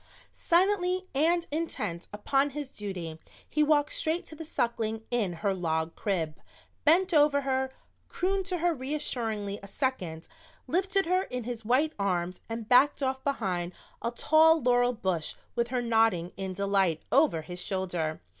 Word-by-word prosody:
Silently 370 +1 +2
and 335 +5 +2
intent 215 - -3
upon 270 +7 +1
his 285 -1 -6
duty 180 -6 -6 0.3
he 300 - 0
walked 300 -1 +3
straight 320 +3 0
to - - -11
the 325 - -7
Suckling 225 -7 -2
in 225 -7 +1
her 200 - +3
log 160 -3 -2
crib, 165 -7 -2 0.4
bent 355 +4 +5
over 295 -2 +5
her, 265 -1 0 0.4
crooned 385 +1 -1
to 365 -2 -1
her 345 +1 +1
reassuringly 235 -8 -3
a 200 - -10
second, 185 - -3 0.4
lifted 385 +6 +2
her 365 +2 +2
in 250 -1 -4
his 235 -1 -5
white 265 +8 +2
arms 180 -2 -1
and 225 -1 -5
backed 275 +4 +4
off 265 0 -1
behind 185 -10 -1 0.3
a 235 - 0
tall 315 +6 +5
laurel 245 -1 +3
bush 185 -8 -2 0.2
with 235 0 0
her 245 0 -1
nodding 225 -7 +2
in 190 -1 -4
delight 195 -4 +1
over 275 - +3
his 180 +2 -6
shoulder. 175 -5 -2
245 Hz, 155 wpm, -29 LUFS, 190-300 Hz, 0.4 s, bent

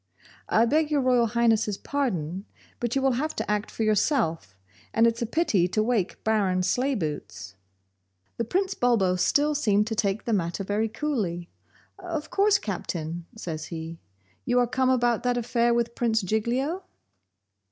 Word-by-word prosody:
'I 225 - +4
beg 300 +5 +2
Your 295 -2 +2
Royal 250 -2 +3
Highness's 225 -3 +2
pardon, 195 - -2 0.3
but 240 0 -2
you 270 - +1
will 270 - +4
have 310 +1 -3
to - - -3
act 210 0 -1
for 225 - -3
yourself, 205 - 0 0.4
and 225 - +5
it's 230 0 +1
a 235 - 0
pity 220 - +2
to 215 +4 0
wake 220 -5 -1
Baron 195 -4 +1
Sleibootz.' 185 - -2 0.8
The 235 - 0
Prince 380 - 0
Bulbo 225 - +2
still 290 +11 +2
seemed 210 -8 +2
to 220 - -3
take 200 0 -1
the 230 - 0
matter 175 0 -1
very 210 +3 -1
coolly. 205 - -3 0.5
'Of 335 -4 -5
course, 400 0 +4
Captain,' 170 - -5
says 160 -6 -5
he, 165 0 -7 0.4
'you 245 - +1
are 245 - +5
come 255 +2 +1
about 240 -3 +2
that 245 0 0
affair 235 0 +1
with 235 0 0
Prince 225 -3 0
Giglio? 245 - -1
225 Hz, 160 wpm, -26 LUFS, 190-255 Hz, 0.8 s, and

